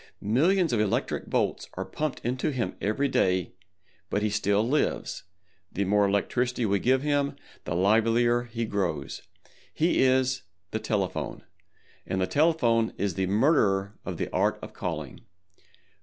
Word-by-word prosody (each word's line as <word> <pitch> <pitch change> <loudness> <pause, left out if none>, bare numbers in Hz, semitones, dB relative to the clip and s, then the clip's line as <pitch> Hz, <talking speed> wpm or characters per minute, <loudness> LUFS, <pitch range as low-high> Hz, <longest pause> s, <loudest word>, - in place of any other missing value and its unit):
Millions 165 - +2
of 115 - +2
electric 105 -2 -1
volts - - -1
are - - -3
pumped 155 -2 -3
into 125 +5 -1
him 130 -5 -2
every 110 +8 +1
day, 95 -8 +1 0.6
but 105 - 0
he 105 - +1
still 105 +1 +1
lives—the 95 - -3
more 100 +1 +3
electricity 120 +5 0
we 100 -1 +2
give 130 +4 +2
him 145 -1 +1 0.3
the 85 - -2
livelier 115 +5 +3
he 115 -1 -3
grows. 95 -10 -2 0.5
He 165 +3 +2
is 130 0 +3 0.3
the 110 - -1
Telephone, 100 -4 -2 0.6
and 95 - -1
the 95 - +2
Telephone 125 - +2
is 100 -2 -1
the 95 +2 -1
murderer 100 - +2
of - - -5
the - - -2
Art - - +2
of - - -8
Calling. - - -5
110 Hz, 140 wpm, -27 LUFS, 100-130 Hz, 0.6 s, more